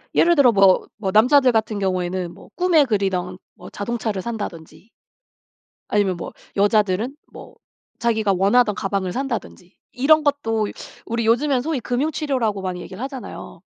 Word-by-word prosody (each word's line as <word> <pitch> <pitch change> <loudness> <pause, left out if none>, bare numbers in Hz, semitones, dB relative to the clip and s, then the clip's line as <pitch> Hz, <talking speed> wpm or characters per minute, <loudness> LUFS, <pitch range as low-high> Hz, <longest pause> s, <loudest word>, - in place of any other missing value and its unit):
예를 345 0 +4
들어 270 -4 +6
뭐, 195 -3 +4
뭐 195 -3 -2
남자들 255 +5 +5
같은 220 -2 0
경우에는 185 -2 -2
뭐 - - -16
꿈에 350 -5 +4
그리던 190 -5 -1 0.2
뭐 - - -12
자동차를 215 -2 -3
산다든지 205 -3 -7 1.0
아니면 200 -3 +1
뭐 - - -7 0.2
여자들은 205 +4 +1 0.2
뭐 - - -12 0.4
자기가 220 -4 +1
원하던 210 +4 +3
가방을 195 -2 -2
산다든지 235 -7 -5 0.2
이런 305 +4 +3
것도 225 -7 0 0.4
우리 230 0 -2
요즘엔 250 +3 +2
소위 310 -1 -2
금융 255 +7 -1
치료라고 245 -10 -1
많이 185 -1 -4
얘기를 190 +4 -9
하잖아요. 270 -2 -8
220 Hz, 340 characters per minute, -21 LUFS, 195-260 Hz, 1.0 s, 들어